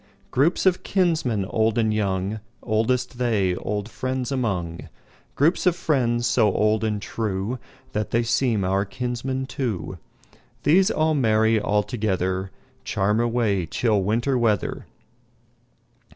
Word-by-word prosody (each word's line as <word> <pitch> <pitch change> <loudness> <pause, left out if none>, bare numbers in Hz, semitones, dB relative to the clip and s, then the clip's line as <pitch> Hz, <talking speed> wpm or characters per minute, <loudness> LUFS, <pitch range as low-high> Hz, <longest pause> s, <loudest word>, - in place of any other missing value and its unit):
Groups 150 +10 +2
of 185 -1 +3
kinsmen, 160 - +1
old 110 +3 +1
and 110 -2 +2
young, 100 0 -1 0.2
Oldest 120 +3 0
they 105 -7 +1
old 105 0 -3
friends 130 +2 -3
among; 95 - -2 0.5
Groups 165 +6 +2
of 175 - +4
friends, 120 -8 +1
so 110 -3 +3
old 110 +2 +1
and 105 -1 0
trueThat 105 +1 -4
they 120 +1 +1
seem 115 -3 +1
our 95 +2 +1
kinsmen 125 +3 -3
too; 105 - -4 0.6
These 185 +7 +5
all 160 -6 +1
merry 110 -4 +3
all 105 0 +1
togetherCharm 95 0 -2
away 110 -7 0
chill 105 +3 +1
Winter 120 +7 +1
weather. 110 -4 0
110 Hz, 120 wpm, -24 LUFS, 100-125 Hz, 0.6 s, These